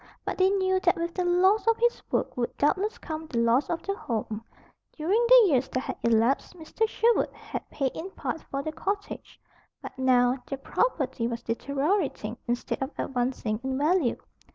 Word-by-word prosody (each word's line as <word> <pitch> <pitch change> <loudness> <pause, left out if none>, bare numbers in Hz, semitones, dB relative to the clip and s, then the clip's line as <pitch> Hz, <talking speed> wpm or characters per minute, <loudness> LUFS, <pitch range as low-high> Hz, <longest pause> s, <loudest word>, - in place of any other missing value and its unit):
But - - -3
they 375 +1 +5
knew 375 -1 +2
that 355 -1 +3
with 335 0 -3
the 365 - -1
loss 375 +5 +3
of 455 0 +4
his 475 0 +1
work - - 0
would 240 -1 -3
doubtless 385 +9 +1
come 315 0 -6
the 245 - -4
loss 235 +4 +3
of 335 -1 -2
the 395 - -1
home. 225 - -4 0.5
During 380 +10 +2
the - - +8
years 265 -3 +2
that 255 - -1
had - - -5
elapsed, 235 +8 +2
Mr. 350 +7 -1
Sherwood 460 +1 +2
had - - -7
paid 270 -3 -1
in 355 +4 -6
part 325 -4 -4
for 275 0 -3
the 310 - -3
cottage; 400 +5 -5 0.4
but - - -9
now 250 0 +3
the 275 - -4
property 265 - -1
was 235 -1 -4
deteriorating 280 - -1
instead 240 +2 -2
of 265 - -1
advancing 245 -4 -2
in 265 0 -2
value. 300 -3 +2
300 Hz, 180 wpm, -27 LUFS, 250-375 Hz, 0.5 s, the